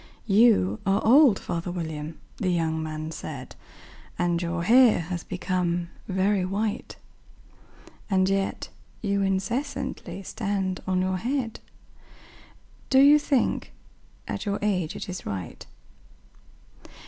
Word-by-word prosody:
"YOU 200 - +4
are 195 +1 +2
old, 255 -2 +7
father 175 0 -4
William," 160 -3 -5 0.2
the 185 - -1
young 160 -2 0
man 155 0 -5
said, 140 -5 -7 0.6
"And 175 -1 +1
your 170 0 -2
hair 240 +1 +6
has 175 +1 -5
become 175 -1 -2 0.2
very 190 0 +1
white; 205 +3 -2 1.1
And 190 -1 +3
yet 195 0 -1 0.3
you 200 -1 +1
incessantly 195 +3 -2
stand 195 -3 -2
on 185 -1 +1
your 185 0 0
head 240 +2 -2 1.3
Do 265 - +4
you 290 +2 +8
think, 280 -4 0 0.5
at - - -3
your 200 0 0
age, 185 -6 0
it - - -6
is 180 -1 -6
right? 95 -4 -6
185 Hz, 115 wpm, -26 LUFS, 170-210 Hz, 1.3 s, you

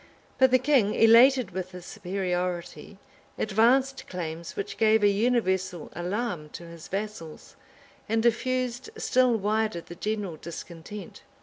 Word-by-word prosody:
But 260 0 +6
the 255 - +5
king, 255 -6 +2
elated 235 0 +6
with 185 0 -5
his 180 -1 -9
superiority, 180 -2 -4 0.4
advanced 245 +6 +2
claims 170 -2 -6
which 200 +1 -5
gave 220 -1 +4
a - - +7
universal 190 -5 0
alarm 180 -3 -3
to 170 - -8
his 170 -1 -11
vassals, 195 -5 -6 0.5
and 225 0 +1
diffused 250 - 0
still 255 - +2
wider 215 -2 0
the 170 - -11
general 205 -2 -3
discontent. 170 +5 -9
205 Hz, 125 wpm, -27 LUFS, 180-235 Hz, 0.5 s, a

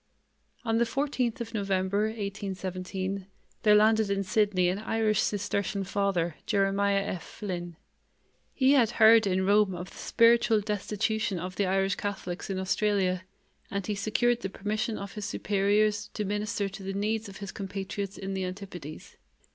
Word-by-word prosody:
On 225 0 +2
the 235 - +4
fourteenth 260 -2 -1
of 230 0 -6
November, 200 0 0
1817, 195 -2 -4 0.3
there 210 -1 +6
landed 220 0 +4
in 195 0 0
Sydney 205 -2 +2
an 185 +3 0
Irish 220 -1 +1
Cistercian 200 -1 -1
Father, 190 -4 0
Jeremiah 200 -1 +2
F. 185 -3 -4
Flynn. 175 -5 -6 0.8
He 265 0 +3
had 250 -6 +5
heard 220 -1 +7
in 190 0 +1
Rome 200 -1 +4
of 180 +2 -7
the - - -14
spiritual 230 -1 +4
destitution 210 0 -1
of 180 +2 -5
the 200 - +1
Irish 195 0 +1
Catholics 195 -3 -4
in 190 - -2
Australia, 190 -1 +1 0.4
and 200 -1 -3
he 210 - -1
secured 235 +4 +1
the 195 - -3
permission 215 +4 -2
of 200 0 -7
his 210 -1 -5
superiors 205 +2 +1
to 210 - -2
minister 205 0 -1
to 195 +1 -9
the 195 0 -4
needs 215 +2 -1
of 195 - -10
his 200 -2 -6
compatriots 195 0 -5
in 195 0 -4
the 190 0 -2
Antipodes. 180 -5 -8
200 Hz, 155 wpm, -28 LUFS, 190-215 Hz, 0.8 s, heard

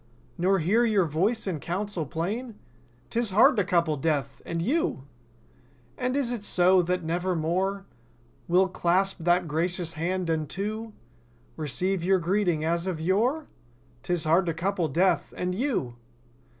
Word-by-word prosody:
Nor 185 +2 +2
hear 195 +8 +2
your 210 -6 +3
voice 190 +10 0
in 180 -6 -2
counsel 180 -1 -3
plain?— 205 - -4 0.5
'Tis 235 -1 +1
hard 240 +8 +5
to 205 - +3
couple 170 -5 +1
Death—and 145 +2 -2
you— 235 - 0 0.9
And, 250 - -2
is 260 -4 0
it 235 -4 -4
so, 185 -1 +4
that 180 0 -1
never 175 +3 -1
more 190 +5 -1 0.6
We'll 185 +2 +4
clasp 185 +2 +1
that 175 +1 +2
gracious 165 +2 -2
hand! 180 +3 -2
And, 155 -3 -1
too. 215 +4 -4 0.6
Receive 175 +5 -1
your 190 +2 +3
greeting 175 -3 0
as 170 +2 0
of 180 -4 -2
yore?— 225 - +1 0.6
'Tis 175 +1 -1
hard 170 +3 +3
to 165 - -1
couple 180 0 -1
Death—and 180 +2 0
you! 190 - -2
180 Hz, 140 wpm, -26 LUFS, 165-200 Hz, 0.9 s, hard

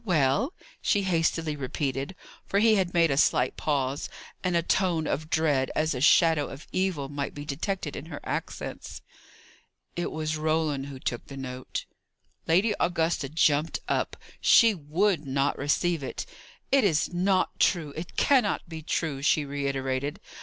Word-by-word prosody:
well?" 180 - +2 0.3
she 205 - +2
hastily 165 -3 0
repeated 135 +3 -3 0.3
for 200 - 0
he 220 +2 +5
had 190 -4 +1
made 165 -3 +3
a - - +2
slight - - +3
pause 140 -2 -1 0.3
and 180 -2 0
a 170 - +2
tone 175 -3 +1
of 155 +2 -2
dread, 150 -5 +2
as 155 0 +1
a 125 - -4
shadow 160 0 +5
of 135 +4 -10
evil, 185 -7 -1
might 140 0 -4
be 145 0 -7
detected 155 +2 -3
in 155 - -7
her 150 -4 -7
accents. - - -5 0.9
"It 175 - -2
was 155 0 -2
Roland 155 -3 0
who 140 -1 -8
took 120 -2 -4
the 135 - -9
note." 130 -1 -5 0.6
Lady 190 +7 +3
Augusta 165 -4 0
jumped 155 0 +2
up. - - 0 0.2
She 230 -2 +6
would 170 +1 0
not 135 +1 +1
receive 160 +4 0
it. 135 - -5 0.5
"It 275 -2 +5
is 175 -3 +1
not 185 +1 +1
true; 155 -5 +2
it 160 0 -7
cannot 255 -11 +2
be 160 -1 -7
true!" 155 -3 -2
she 150 0 +2
reiterated. 140 0 -2
155 Hz, 155 wpm, -27 LUFS, 140-175 Hz, 0.9 s, She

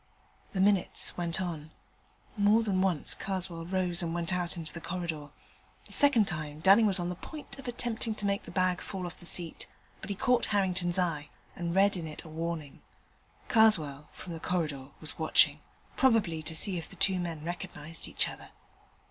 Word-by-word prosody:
The 190 - -2
minutes 195 -1 +3
went 170 0 -1
on. 165 -4 -4 0.7
More 210 +2 +4
than 195 -4 +1
once 185 -6 +1
Karswell 180 -4 -3
rose 180 -2 +1
and 170 -1 -2
went 175 +1 -1
out 180 0 -1
into 160 -2 -3
the 170 - -7
corridor. 165 -5 -4 0.6
The - - -6
second 265 -8 +5
time 150 -4 -4
Dunning 195 +6 +6
was 190 -2 +3
on 175 0 -1
the 180 - -3
point 295 - -9
of 270 - -9
attempting 235 -2 -2
to 205 - -2
make 200 0 +1
the - - -12
bag 185 -1 +1
fall 190 -2 -5
off 175 - -8
the 175 - -7
seat, 170 -3 -2 0.3
but - - -8
he 200 - -1
caught 250 +5 +2
Harrington's 185 -3 +1
eye, 160 -5 0 0.3
and 170 0 -3
read 200 +1 +5
in 170 -3 -4
it 155 - -8
a 165 - -11
warning. 160 -3 -4 0.7
Karswell, 155 -11 +3
from 175 - -9
the 165 - -6
corridor, 155 -7 -2
was 155 +1 -9
watching: 160 - +4 0.4
probably 215 -11 +3
to 160 +1 -2
see 180 +2 +2
if 165 - -8
the - - -11
two 190 -2 +2
men 165 -3 -4
recognized 170 -2 -6
each - - +1
other. - - -9
175 Hz, 190 wpm, -30 LUFS, 165-195 Hz, 0.7 s, Dunning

